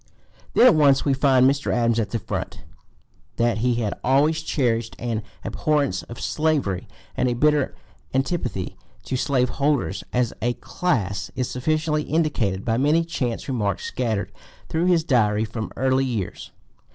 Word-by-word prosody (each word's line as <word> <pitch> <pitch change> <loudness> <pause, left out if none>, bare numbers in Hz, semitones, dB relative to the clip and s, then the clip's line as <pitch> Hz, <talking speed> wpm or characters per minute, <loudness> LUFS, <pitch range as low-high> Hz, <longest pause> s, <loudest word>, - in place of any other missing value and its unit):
Then - - +7
at 250 - +8
once 140 -3 +4
we 140 - +3
find 130 -1 +4
Mr. 140 +1 +1
Adams 115 -1 +2
at 105 -3 -1
the 115 - -1
front. 110 - -5 0.7
That 120 -1 +1
he 120 +1 +2
had 110 -3 -1
always 145 +5 +3
cherished 120 -7 -1
an 115 -2 -2 0.2
abhorrence 140 - 0
of 115 +7 -10
slavery 150 - 0 0.3
and 125 - +1
a 120 - 0
bitter 150 +2 +2 0.4
antipathy 130 - -2 0.3
to 130 - -3
slave 130 -1 +1
holders 145 -2 +1
as 125 -2 0
a 120 +1 +1
class 100 - -2
is 125 -1 -2
sufficiently 155 +3 0
indicated 145 - 0
by 115 -1 +1
many 155 +5 +3
chance 125 -8 -3
remarks 110 -7 -1
scattered 110 -5 -2 0.4
through 165 +2 0
his 175 -3 +3
Diary 110 -7 +2
from 110 0 -5
early 130 +1 +2
years. 115 -8 -4
125 Hz, 150 wpm, -23 LUFS, 115-150 Hz, 0.7 s, at